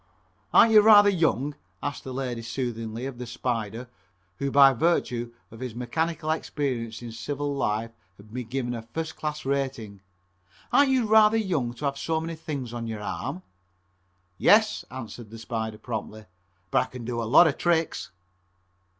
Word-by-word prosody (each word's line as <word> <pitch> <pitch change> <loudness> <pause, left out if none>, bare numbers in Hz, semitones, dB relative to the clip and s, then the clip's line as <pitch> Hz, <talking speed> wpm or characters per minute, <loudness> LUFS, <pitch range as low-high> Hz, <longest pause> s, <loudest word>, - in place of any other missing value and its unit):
"Arn't 225 - +7
you 215 -1 +8
rather 205 -1 +8
young?" 155 -5 +1 0.3
asked 145 - -4
the 130 - -7
lady 125 -3 -3
soothingly 115 -1 -4
of 135 -3 -6
the 125 - -6
"Spider," 115 -1 -3 0.5
who 140 - -1
by 135 0 +7
virtue 120 -5 0 0.2
of 115 - -12
his 125 -3 -5
mechanical 155 +7 -2
experience 125 -7 -3
in 120 - -6
civil 145 +5 -3
life 115 -4 -1 0.3
had 105 +2 -16
been 125 -2 -5
given 125 -1 -2
a 115 - -4
first 160 +8 -5
class 150 -2 -4
rating, 130 -7 -2 0.7
"Arn't 285 -1 +5
you 260 -3 +2
rather 220 0 +6
young 155 - -1
to 145 - -5
have 140 0 -1
so 160 +2 0
many 165 +1 -4
things 140 -7 -5
on 115 -1 -4
your 110 -2 -5
arm?" 140 - -4 1.0
"Yes," 210 0 +4
answered 120 -3 -8
the 115 - -10
"Spider" 110 -1 -4
promptly, 110 -2 -6 0.5
"but - - +4
I - - -2
kin 125 -2 -8
do 120 0 -2
a - - -2
lot 150 +7 +8
of 155 - 0
tricks." 165 -2 0
130 Hz, 165 wpm, -26 LUFS, 115-160 Hz, 1.0 s, you